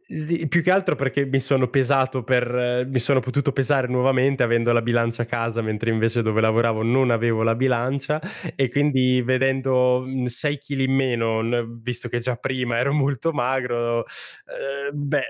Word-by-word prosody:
Sì. 160 +1 -2
Più 170 +4 +2
che 180 - 0
altro 190 +1 +2
perché 140 +1 -1
mi 135 0 0
sono 130 -1 +1
pesato 130 0 +1
per 125 0 0
mi 130 -1 -1
sono 130 +3 +3
potuto 140 +2 -1
pesare 135 -1 +1
nuovamente, 130 +1 +2
avendo 120 0 +2
la 120 - +3
bilancia 115 0 0
a - - -6
casa, 115 -1 -2
mentre 110 +1 -2
invece 115 +1 +1
dove 110 -1 0
lavoravo 110 0 +1
non 125 +3 +2
avevo 115 -1 +1
la 115 0 +2
bilancia, 135 +4 -1 0.3
e 135 -2 0
quindi 130 -2 +2
vedendo, 130 0 +1
mhmm, 130 0 -4
6 145 +4 +1
chili 140 -1 -3
in 130 0 +1
meno 115 -4 0
n 115 0 -3
visto 120 0 -4
che 120 - -2
già 125 +1 -2
prima 125 -1 -2
ero 140 +4 +1
molto 145 +2 0
magro, 120 -3 -1
uhm, 140 +4 -7 0.2
beh, 145 +1 0
125 Hz, 175 wpm, -22 LUFS, 120-135 Hz, 0.3 s, sono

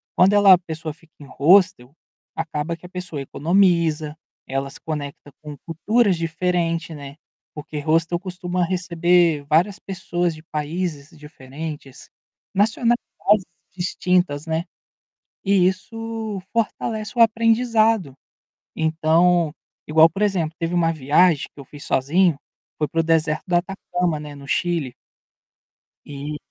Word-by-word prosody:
quando 190 +3 +5
ela 205 -2 +7
a - - +7
pessoa 160 -3 -6
fica 165 0 -24
em 145 - -11
hostel, 140 -3 +3 0.4
acaba 160 0 -3
que 180 - -16
a - - -10
pessoa 180 -5 -6
economiza, 160 0 +1 0.3
ela 135 +1 -3
se - - -12
conecta 145 -2 -6
com 150 -2 -9
culturas 200 +5 +2
diferente, 165 0 -1
né, 140 -1 -9 0.4
porque 150 0 -7
hostel 165 +3 +1
costuma 180 -1 -3
receber 175 -3 +2
várias 180 +6 +2
pessoas 175 -3 -2
de 155 - -14
países 155 -1 -4
diferentes, 150 0 -9 0.4
nacionais 225 +4 +2 0.8
distintas, 175 -4 0
né, 160 +2 -2 0.8
e 195 -2 +4
isso 220 +1 -4
fortalece 220 0 -2
o - - +5
aprendizado. 225 - +3 0.6
Então, 160 +1 +2 0.3
igual, 160 +1 +6
por 195 +6 -2
exemplo, 170 -6 0
teve 165 +1 -3
uma 165 -2 +2
viagem 155 +2 +3
que - - -16
eu 135 - -10
fiz 145 +1 -12
sozinho, 165 +6 +2 0.4
foi 150 - 0
para 165 +3 0
o - - -4
deserto 160 -1 +1
do 175 -2 0
Atacama, 180 -3 -2
né, 150 -1 -9
no 140 0 -12
Chile 165 -6 -1 1.1
e 145 +1 -6
165 Hz, 130 wpm, -22 LUFS, 150-185 Hz, 1.1 s, ela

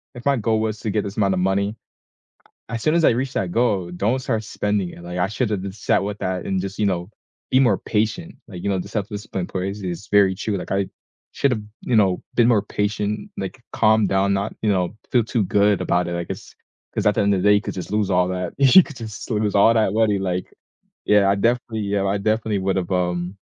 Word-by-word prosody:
if 120 - -10
my 140 -1 +3
goal 110 -2 +1
was 110 -1 -2
to 110 - -2
get 105 0 0
this 100 0 -7
amount 100 -3 +2
of 95 - 0
money, 100 +3 0 0.9
as 115 -1 -4
soon 155 - +3
as 170 - +3
I - - +6
reach 130 +3 -2
that 90 -3 -1
goal, 100 -6 +1
don't 105 +8 0
start 110 -4 -2
spending 105 -2 -1
it, 85 - -12
like, 90 +1 -6
I 90 +1 +1
shoulda 105 0 -1
just 95 +1 -7
sat - - +2
with 100 +1 -4
that 95 -1 -2
and 95 -1 -1
just, 100 +2 -6
you 105 - +2
know, 90 -1 -1 0.4
be 130 - +5
more 120 -8 +4
patient, 120 - -2
like, 90 -5 -9
you - - 0
know, 95 -2 0
the 90 - -6
self-discipline 105 -3 -4
place 100 +2 -4
is 90 +1 -5
very 100 -2 +5
true, 105 0 -2
like, - - -7
I 100 0 +1 0.4
should’ve, 125 -6 0 0.3
you - - +4
know, 100 -4 +5 0.2
been 120 -1 +5
more 115 -4 +4 0.2
patient, 105 0 -1
like, 95 +6 -5
calm 110 -2 +4
down, 95 +1 +2
not 100 +2 -2
you 110 - +2
know, 90 -2 +2 0.3
feel 120 -2 +4
too 115 -1 0
good 100 0 +2
about 90 -1 +1
it, 85 - -3
I 85 - -2
guess, - - -8 0.4
‘cause - - -1
at 105 - +4
the 110 - +2
end 100 0 +3
of 95 - -1
day, 105 - +6
you 105 - +3
could - - -5
just 90 - -7
lose 105 -2 +1
all 90 0 +3
that 90 -1 -2
you 140 +7 +8
could 145 - -11
just 110 -3 -8
lose 105 -1 0
all 105 +3 +6
that 110 -4 +2
money, 110 -2 +2
like 90 -1 -2 0.6
yeah, 105 -1 +5
I - - +4
definitely 115 +2 0
yeah, 100 -1 +1
I 100 +1 0
definitely 110 0 0
would've, 95 -2 -1
um 90 +1 -1
100 Hz, 235 wpm, -22 LUFS, 95-110 Hz, 0.9 s, you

